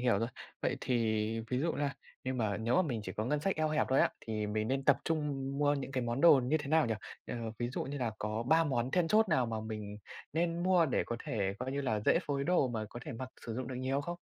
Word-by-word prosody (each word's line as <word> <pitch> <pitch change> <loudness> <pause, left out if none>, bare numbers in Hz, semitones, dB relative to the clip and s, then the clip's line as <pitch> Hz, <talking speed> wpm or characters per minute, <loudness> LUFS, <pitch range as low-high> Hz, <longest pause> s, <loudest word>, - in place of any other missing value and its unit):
hiểu 120 -5 +3
rồi. 115 +3 0 0.3
Vậy - - +1
thì 125 - 0 0.6
ví 125 - +1
dụ 160 +3 +1
là 140 -1 -1 0.3
nhưng 130 0 -1
mà 105 -3 0
nếu 115 +6 +1
mà 185 - +5
mình 125 -9 -2
chỉ - - -5
có 110 - -2
ngân 145 +4 0
sách 195 +2 0
eo 155 0 +1
hẹp 155 0 +1
thôi 130 - +4
á - - +4
thì 110 -2 -3
mình 110 +2 -1
nên 135 0 0
tập - - +6
trung 145 -4 -1
mua 145 0 +3
những 135 -1 -4
cái 130 - 0
món 120 +3 -1
đồ 155 -6 +8
như 150 +6 +2
thế 145 -2 -6
nào 160 -2 +4
nhỉ? 115 - 0 0.3
À, - - -4 0.2
ví 120 0 -1
dụ 125 - -3
như 140 +1 -4
là 120 -3 0
có 110 +2 -2
3 160 +6 +4
món 130 -4 0
then 175 0 +2
chốt 215 +3 +4
nào 130 -7 +3
mà 110 -1 -2
mình 105 -2 -5 0.4
nên 170 +1 0
mua 180 -3 +4
để 135 - +1
có 120 - -2
thể 100 -3 -1
coi 130 +1 -3
như 140 - -1
là 125 -6 0
dễ - - +4
phối 140 -1 -1
đồ 170 -6 +3
mà 110 -2 -2
có 120 - -7
thể 150 - -6
mặc 125 +2 -5 0.2
sử 115 - -3
dụng 130 0 -4
được 130 - -4
nhiều 130 +2 0
không? 175 +4 -4
130 Hz, 280 wpm, -33 LUFS, 115-150 Hz, 0.6 s, đồ